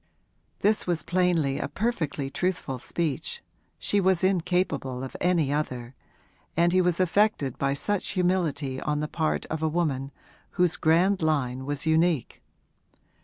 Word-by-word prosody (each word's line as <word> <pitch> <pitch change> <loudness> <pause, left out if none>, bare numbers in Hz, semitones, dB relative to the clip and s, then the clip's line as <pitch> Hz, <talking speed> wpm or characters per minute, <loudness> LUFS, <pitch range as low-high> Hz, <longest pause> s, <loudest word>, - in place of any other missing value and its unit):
This 215 0 +2
was 170 -3 0
plainly 175 -6 +1
a - - -2
perfectly 160 - -2
truthful 165 -6 -2
speech 170 - -3 0.3
she 205 - +1
was 190 -1 +2
incapable 175 -8 0
of 130 - -7
any 170 -6 +2
other 125 -5 -3 0.6
and 170 +1 +4
he 185 - +5
was 180 -1 +1
affected 185 - +2
by 140 0 +1
such 205 +7 -1
humility 155 -7 0
on 150 0 -1
the 150 - -2
part 155 0 -1
of 160 0 -2
a 160 - +1
woman 145 -5 -1 0.5
whose 180 -2 +3
grand 175 +5 +3
line 130 -5 0
was 145 +1 -2
unique. 160 -4 +1
160 Hz, 140 wpm, -26 LUFS, 140-180 Hz, 0.6 s, he